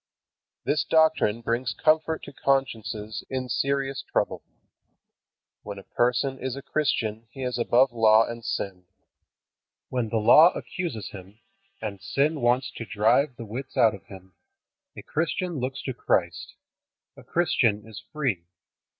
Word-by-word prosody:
This 150 0 +1
doctrine 160 -9 +3
brings 120 +2 -1
comfort 160 +1 +2
to - - -9
consciences 110 -6 -1
in 130 -1 -3
serious 135 +1 -1
trouble. - - 0 1.2
When 100 -1 -7
a 100 - -9
person 125 +4 0
is 130 0 -3
a 140 - -8
Christian 115 -7 -1
he 135 +1 -8
is 125 -1 -2
above 125 +2 +4
law 110 -1 +5
and 115 0 -7
sin. 95 -5 -4 1.0
When 125 -3 -1
the 115 - 0
Law 155 +10 +7
accuses 175 - -5
him, 95 +1 -11 0.5
and 100 -3 -5
sin 140 +10 0
wants 120 +2 +2
to - - -4
drive 115 +7 +2
the 115 -1 -8
wits 125 +5 -7
out 110 -1 +5
of 100 - -11
him, 95 -3 -13 0.6
a - - -8
Christian 165 +1 -2
looks 130 +2 -4
to 130 - -3
Christ. 85 -7 -1 0.6
A - - -14
Christian 115 -11 +1
is 110 - -9
free. 130 - -1
120 Hz, 140 wpm, -26 LUFS, 110-140 Hz, 1.2 s, Law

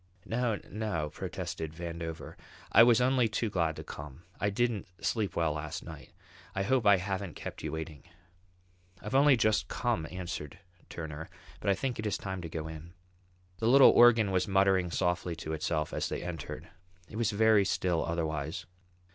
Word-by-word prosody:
"No, 115 -1 0
no," 100 -9 -3
protested 80 +1 -5
Vandover. 85 -1 -6 0.4
"I 110 - +8
was 120 0 +7
only 125 -1 +3
too 110 0 -1
glad 85 -4 0
to - - -7
come. 75 +2 -9 0.2
I 105 - +1
didn't 115 0 0 0.2
sleep 110 -4 0
well 80 -2 +1
last 75 0 -5
night. - - -10 0.4
I 95 - 0
hope 125 0 +2
I 100 -1 +7
haven't 95 -1 -4
kept - - -7
you - - -4
waiting." 80 -2 -6 0.9
"I've 105 +6 -7
only 140 0 +6
just 110 -2 +2
come," 120 -11 -1
answered 90 -2 -6 0.3
Turner. 80 -1 -6 0.3
"But - - -1
I 100 - +4
think 130 -1 -3
it 110 - -2
is 100 - -1
time 95 -2 -5
to 85 - -6
go 80 -1 -4
in." 80 +2 -9 0.7
The 110 - 0
little 135 +2 +8
organ 115 -4 +6
was 90 -1 +1
muttering 95 -2 +3
softly 90 0 -1
to 80 -1 -5
itself 75 0 -1
as - - -1
they - - -4
entered. 85 -5 -6 0.4
It 105 - -9
was 115 -2 +1
very 110 -1 +4
still 90 -3 0
otherwise. 80 +1 -3
95 Hz, 170 wpm, -30 LUFS, 80-110 Hz, 0.9 s, I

